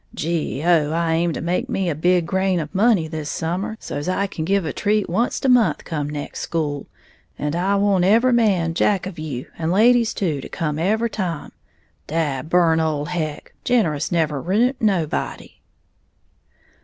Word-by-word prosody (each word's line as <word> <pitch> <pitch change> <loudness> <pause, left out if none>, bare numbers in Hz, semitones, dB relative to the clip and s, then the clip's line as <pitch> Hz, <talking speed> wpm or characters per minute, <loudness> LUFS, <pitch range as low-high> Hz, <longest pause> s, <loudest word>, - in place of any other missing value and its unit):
Gee 160 -3 -2
oh, 165 -4 +3
I 165 0 +1
aim 170 +1 +1
to - - -4
make 175 +2 -1
me 190 -1 -1
a 170 - +1
big 175 +3 +2
grain 190 0 +1
of 155 +1 -5
money 200 -4 +3
this 155 -2 -5
summer, 180 +7 -3
so's 145 +5 -4
I 195 +2 +1
can 170 -5 -5
give 195 0 +1
a 155 - -3
treat 210 -1 +1
onct 230 +10 -1
a - - +4
month 250 -4 +3
come 150 -3 -3
next 145 -1 -6
school; 145 -4 -3 0.5
and 150 +1 -2
I 190 +3 +1
want 200 -2 +2
every 230 +7 +4
man 195 -8 +2
jack 190 +2 +1
of 185 -4 -7
you, 140 -5 -5
and 165 0 -1
ladies 230 +4 +4
too, 155 -8 -1
to - - -9
come 155 -4 -2
every 220 +6 +1
time. 175 -7 -4 0.6
Dad 155 -3 -2
burn 170 -2 +4
ole 155 -2 0
Heck, 160 -3 -4
generous 165 -12 +1
never 155 -5 0
ruint 230 - +1
nobody!" 185 -8 -1
170 Hz, 175 wpm, -21 LUFS, 155-200 Hz, 0.6 s, a